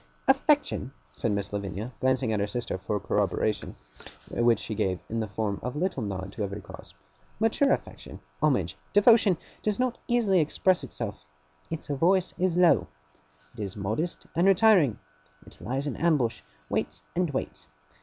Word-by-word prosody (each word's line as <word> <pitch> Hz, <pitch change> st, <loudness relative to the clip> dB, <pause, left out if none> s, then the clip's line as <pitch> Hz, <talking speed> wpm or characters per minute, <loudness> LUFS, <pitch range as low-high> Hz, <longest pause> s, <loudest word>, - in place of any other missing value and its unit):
'Affection,' 270 Hz, -, +2 dB, 0.2 s
said 115 Hz, -, -1 dB
Miss 100 Hz, 0 st, -2 dB
Lavinia, 100 Hz, +4 st, -4 dB
glancing 130 Hz, -3 st, +1 dB
at 105 Hz, -, 0 dB
her 100 Hz, -, 0 dB
sister 110 Hz, -3 st, -3 dB
for 105 Hz, +2 st, -2 dB
corroboration, 105 Hz, +2 st, -1 dB, 0.6 s
which 120 Hz, -1 st, +3 dB
she 110 Hz, -, -5 dB
gave 95 Hz, -3 st, 0 dB
in 115 Hz, -, -1 dB
the 110 Hz, -, -1 dB
form 100 Hz, 0 st, -2 dB
of 125 Hz, +3 st, -4 dB
a -, -, -4 dB
little 175 Hz, -5 st, -1 dB
nod 95 Hz, -2 st, -4 dB
to 105 Hz, -, -4 dB
every 100 Hz, +1 st, -4 dB
clause, 95 Hz, -, -12 dB, 0.4 s
'mature 225 Hz, +6 st, +3 dB
affection, -, -, -4 dB, 0.2 s
homage, -, -, +2 dB, 0.2 s
devotion, 205 Hz, -3 st, +6 dB, 0.2 s
does 210 Hz, -1 st, 0 dB
not 255 Hz, -1 st, -1 dB
easily 225 Hz, -6 st, +3 dB
express 175 Hz, +2 st, +2 dB
itself. 105 Hz, -, -5 dB, 0.5 s
Its 165 Hz, -1 st, -4 dB
voice 175 Hz, +6 st, +2 dB
is 180 Hz, -1 st, +1 dB
low. 180 Hz, -, +5 dB, 0.7 s
It -, -, -13 dB
is 100 Hz, 0 st, -4 dB
modest 110 Hz, -, -2 dB
and 175 Hz, +3 st, +3 dB
retiring, 195 Hz, -, +5 dB, 0.5 s
it -, -, -13 dB
lies 135 Hz, +4 st, -2 dB
in 145 Hz, -, -2 dB
ambush, 140 Hz, -, +1 dB, 0.3 s
waits -, -, -2 dB
and 175 Hz, -1 st, +1 dB
waits. 105 Hz, -, -4 dB
130 Hz, 160 wpm, -27 LUFS, -, 0.7 s, devotion